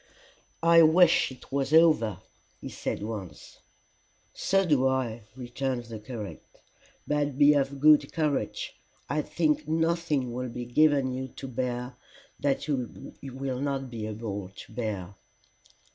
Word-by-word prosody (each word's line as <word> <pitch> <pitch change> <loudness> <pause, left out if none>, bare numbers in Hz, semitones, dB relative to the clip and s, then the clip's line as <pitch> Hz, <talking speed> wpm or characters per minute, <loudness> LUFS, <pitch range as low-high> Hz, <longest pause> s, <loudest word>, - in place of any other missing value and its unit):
"I 165 0 +7
wish 165 -1 +5
it 130 - -14
was 140 0 -1
over," 155 - +5 0.4
he - - -7
said - - -4
once. 100 -8 -7 0.7
"So 195 0 +1
do 140 -6 +3
I," 120 -4 -1
returned 125 0 -3
the 115 -2 -8
curate. 105 -2 -7 0.6
"But 145 -2 -1
be 145 +1 +7
of 140 -1 0
good 150 -1 +5
courage, 150 -3 -2 0.3
I 150 +2 0
think 155 -2 0
nothing 160 -5 0
will 125 +1 -3
be 120 +1 -6
given 135 +1 +3
you 130 +1 -4
to 135 +1 -9
bear 125 0 -3 0.4
that 140 +1 0
you 130 -5 -4
will 135 -1 -4
not 135 -2 -2
be 110 -2 -4
able 105 -3 -5
to 95 - -13
bear." 105 -6 -4
130 Hz, 135 wpm, -28 LUFS, 120-150 Hz, 0.7 s, I